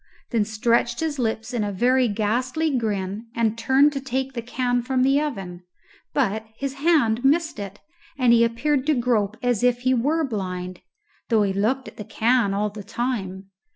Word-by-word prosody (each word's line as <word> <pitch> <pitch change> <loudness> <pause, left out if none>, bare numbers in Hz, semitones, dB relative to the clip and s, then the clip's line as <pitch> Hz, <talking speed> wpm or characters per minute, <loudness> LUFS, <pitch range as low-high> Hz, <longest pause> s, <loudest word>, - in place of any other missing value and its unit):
then 230 -4 +2
stretched 235 +2 +1
his 310 -3 -2
lips 225 +1 -2
in 235 -3 0
a 205 - -2
very 250 +5 +2
ghastly 250 +8 0
grin 210 -2 -2
and 225 -2 +1
turned 265 +5 +3
to 275 - -3
take 265 0 -3
the 235 - -4
can 245 +1 -1
from 255 +1 0
the 275 +2 +3
oven, 195 -12 -5 0.5
but 220 -6 0
his 275 -1 -3
hand 275 -6 +2
missed 310 +2 +2
it, 200 0 -7 0.4
and 250 -3 +4
he 235 0 +5
appeared 260 +4 0
to 305 - +3
grope 225 -4 0
as 245 -4 +1
if 245 0 +2
he 255 +1 +2
were 295 +7 +1
blind, 185 - -4 0.5
though 220 -3 +3
he 195 -1 0
looked 240 +7 0
at - - -12
the 210 - -6
can 230 0 +1
all 205 +1 -1
the 210 0 -8
time. 195 -4 -4
235 Hz, 185 wpm, -23 LUFS, 210-265 Hz, 0.5 s, he